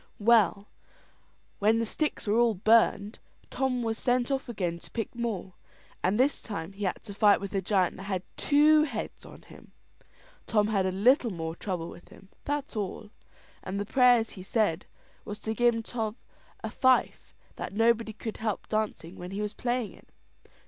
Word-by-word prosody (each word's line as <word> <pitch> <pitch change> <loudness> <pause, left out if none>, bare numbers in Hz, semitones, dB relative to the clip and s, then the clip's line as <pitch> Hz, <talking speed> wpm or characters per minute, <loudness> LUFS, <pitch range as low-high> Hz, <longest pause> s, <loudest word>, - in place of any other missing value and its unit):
Well, 210 -2 +3 0.9
when 215 +2 +4
the 230 - 0
sticks 300 +7 -2
were 215 +2 +2
all 235 -2 +3
burned, 215 +1 +3 0.3
Tom 255 -2 0
was 225 -1 -2
sent 250 +1 +1
off 270 -2 -2
again 180 -7 -2
to - - -12
pick 225 -2 -4
more; 225 -6 -4 0.5
and 195 +5 +1
this 275 +3 +2
time 195 -4 -6
he 200 +1 -4
had 185 - -2
to 205 - -8
fight 205 0 +5
with 200 0 -6
a 195 - 0
giant 190 -1 +1
that 190 - -8
had 185 -2 -1
two 300 +1 +5
heads 250 -8 -4
on - - -14
him. - - -16 0.7
Tom 210 -1 +2
had 195 -3 +1
a - - 0
little 240 - +4
more 165 -4 -4
trouble 175 -3 -4
with 175 - -12
him 195 - -16 0.2
that's 290 -3 -3
all; 210 +1 -4 0.5
and 195 +2 -4
the 205 - -2
prayers 245 -1 +4
he 190 - -9
said, 195 -3 0 0.4
was 210 +1 -7
to 220 - -2
give 235 0 +2
Tom 220 -2 -3 0.5
a - - -4
fife; 260 -1 +1 0.2
that - - -5
nobody 225 +1 +2
could 220 +1 -6
help 215 -3 -3
dancing 215 -5 -2
when 180 0 -7
he 195 +2 -5
was 210 +1 -3
playing 240 -1 -2
it. - - -19
215 Hz, 180 wpm, -28 LUFS, 195-240 Hz, 0.9 s, fight